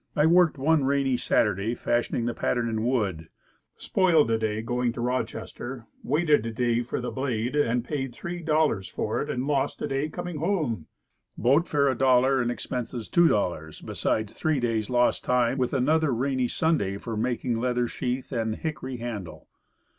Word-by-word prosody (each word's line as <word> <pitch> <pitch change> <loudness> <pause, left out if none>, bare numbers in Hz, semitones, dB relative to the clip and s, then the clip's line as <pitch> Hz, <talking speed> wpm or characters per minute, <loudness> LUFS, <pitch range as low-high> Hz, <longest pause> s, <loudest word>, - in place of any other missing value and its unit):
I 150 -1 +4
worked 170 -1 +4
one 150 +2 +3
rainy 135 -1 +2
Sunday 105 -1 +1
fashioning 120 0 0
the 120 - -1
pattern 120 0 0
in 110 -1 -2
wood. 95 -11 -1 0.5
Spoiled 165 -10 +3
a 115 - +2
day 110 0 -1
going 120 +1 0
to 125 - -8
Rochester, 120 0 -4 0.2
waited 150 -6 +2
a 115 - -3
day 120 +1 +1
for 120 - -3
the 125 - -4
blade, 125 -2 -2
HATCHET 145 -3 +2
AND 120 +1 0
KNIVES. 135 -5 -3
paid 175 -1 -6
$3.00 150 - +2
for - - -2
it, - - -4
and 125 +1 -2
lost 140 -1 0
a - - -2
day 135 +3 -1
coming 175 0 -5
home. 150 - -1 0.5
Boat 140 - +3
fare 140 -2 +2
$1.00, 130 +1 +3
and 120 - 0
expenses 120 -1 -4
$2.00, 90 - +1
besides 110 -1 -1
three 155 -4 0
days 115 -3 -1
lost 125 -1 +2
time, 125 +1 +1
with 125 - 0
another 150 +3 +2
rainy 130 +1 0
Sunday 120 -11 0
for 115 +2 -5
making 120 +1 -1
leather 125 0 0
sheath 125 +3 -3
and 110 -3 -1
hickory 135 -4 -5
handle. 115 -7 -7
125 Hz, 170 wpm, -26 LUFS, 115-145 Hz, 0.5 s, I